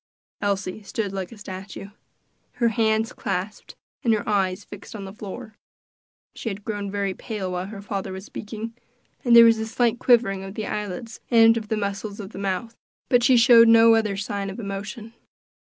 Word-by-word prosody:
Elsie 195 0 -2
stood 205 -1 -4
like 190 -2 -4
a 230 - -11
statue; 195 0 -8 0.6
her 235 -1 +2
hands 220 -1 +1
clasped, 195 +1 -4 0.3
and 235 - +3
her 210 - -4
eyes 195 -1 0
fixed 205 +2 -11
upon 200 -2 -6
the 190 - -9
floor. 215 +2 -9 0.7
She 230 - -5
had 200 0 -6
grown 205 -2 -4
very 200 -1 -2
pale 195 -2 -5
while 180 +1 -3
her 200 -1 -9
father 200 -2 -4
was 190 +1 -7
speaking, 220 +2 -7 0.5
and 240 -2 +5
there 235 0 +10
was 225 -1 +5
a 220 - -3
slight 235 +1 +1
quivering 225 -7 +3
of 195 +1 -8
the 215 - -3
eyelids 210 +2 -5
and 225 -1 +6
of 220 -2 -4
the 220 - -1
muscles 200 0 -4
of 200 0 -7
the - - -8
mouth, 200 +4 -3 0.3
but 245 -1 +4
she 250 0 +5
showed 230 -1 +7
no 230 0 +7
other 215 -3 +1
sign 200 0 -3
of 195 - -7
emotion. 210 +2 -6
210 Hz, 185 wpm, -24 LUFS, 195-225 Hz, 0.7 s, there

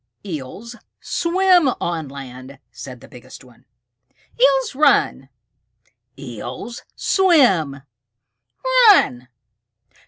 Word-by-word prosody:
"Eels 190 - -8 0.2
swim 355 -3 +2
on 165 -3 -3
land," 135 -1 -11
said 125 -3 -10
the - - -14
biggest 125 +1 -14
one. 125 -2 -21 0.8
"Eels 270 0 +3
run!" 260 - +2 0.9
"Eels 130 - -8
swim!" 195 - +2 1.1
"Run!" 125 - +3
155 Hz, 75 wpm, -20 LUFS, -, 1.1 s, Eels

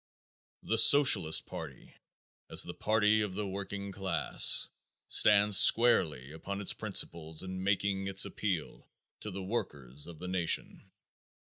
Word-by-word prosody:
The 115 - 0
Socialist 115 - +5
party - - -11 0.6
as - - +3
the - - -8
party 110 0 0
of 100 -3 -5
the 105 +1 -4
working 100 +1 -7
class 95 -2 +2 0.4
stands 105 -1 +5
squarely 80 - +2
upon 100 +6 -8
its 100 - -2
principles 80 -1 -3
in 95 0 -8
making 100 0 -2
its 95 0 0
appeal 95 -7 -6 0.3
to 105 - -7
the 95 -1 -8
workers 75 - -6
of 85 -2 -12
the 90 - -9
nation. 90 -2 -2
95 Hz, 130 wpm, -29 LUFS, 85-105 Hz, 0.6 s, Socialist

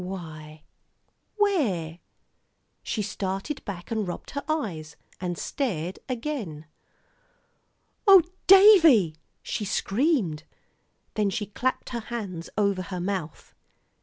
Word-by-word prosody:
"Why 155 -4 -8 0.7
where 220 - 0 0.4
" - - -47 0.3
she 215 - -2
started 195 +7 -4
back 180 -3 -7
and 220 -3 -1
rubbed 175 - -6
her 285 - -4
eyes, 165 - -3 0.2
and 175 -2 -3
stared 185 - -3
again. 230 - -4 1.4
"Oh! 385 -3 +9 0.2
Davie," 335 - +7 0.3
she - - -3
screamed. 210 - 0 0.7
Then 210 -2 +1
she 205 +2 -2
clapped 250 +5 -2
her 240 - -3
hands 205 -7 -6
over 200 -3 +1
her 180 0 -5
mouth. 180 -4 -4
200 Hz, 105 wpm, -26 LUFS, 175-260 Hz, 1.4 s, Oh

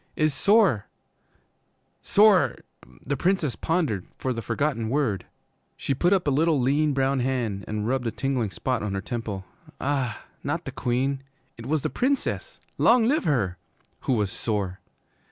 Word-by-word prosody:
is 155 -1 +2
sore 200 - +3 1.1
sore 205 -3 +5 0.3
"' 60 0 -20
The 140 - 0
Princess 170 -3 +1
pondered 155 - -1
for 130 - -1
the 115 - -4
forgotten 125 -5 -1
word. 125 -7 0 0.5
She 140 - -1
put 175 +7 +2
up 195 -3 +3
a - - +3
little 155 +2 +3
lean 145 +4 +2
brown 135 0 +2
hand 120 -6 -1
and 105 0 -2
rubbed 125 -1 0
a - - 0
tingling 130 -3 -1
spot 125 +4 -2
on 105 -2 -2
her 95 - -2
temple 105 -4 -4 0.3
ah, 135 -5 -1 0.2
not - - -2
the - - -4
Queen! 130 +3 -1 0.3
It - - -9
was 150 0 0
the - - -1
Princess 280 - -1 0.2
long 235 -1 +5
live 295 -1 +2
her! 100 - +1 0.4
who 130 - 0
was 105 -5 0
'sore.' 100 -5 -2
135 Hz, 160 wpm, -26 LUFS, 110-155 Hz, 1.1 s, sore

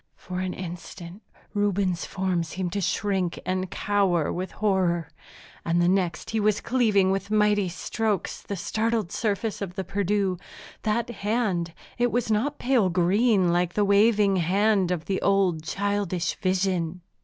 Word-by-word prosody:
For 180 0 -6
an 185 -1 -3
instant 175 +1 -8 0.3
Reuben's 200 -4 0
form 185 -3 -1
seemed 175 +2 -4
to 200 - -1
shrink 190 -1 0
and 185 0 -1
cower 195 -7 +1
with 185 +2 -4
horror, 180 -6 +1 0.5
and 170 +1 +1
the 175 - +3
next 180 -2 0
he 220 - 0
was 210 -1 +2
cleaving 215 -6 +2
with 195 +1 -2
mighty 210 -2 +2
strokes 210 +3 -2
the 200 - -5
startled 220 +1 -1
surface 215 0 -2
of 180 -3 -5
the 190 - -2
Perdu. 195 -1 0 0.4
That 225 +2 0
hand 200 -7 -1 0.2
it 245 -1 +2
was 235 -2 0
not 265 +8 0
pale 245 -7 +2
green, 185 +1 +3
like 175 0 0
the 210 - +3
waving 200 -1 +4
hand 195 +2 +2
of 175 -3 -2
the 195 - -1
old, 195 -5 +2
childish 195 0 -1
vision. 185 -3 -1
195 Hz, 150 wpm, -26 LUFS, 180-210 Hz, 0.5 s, waving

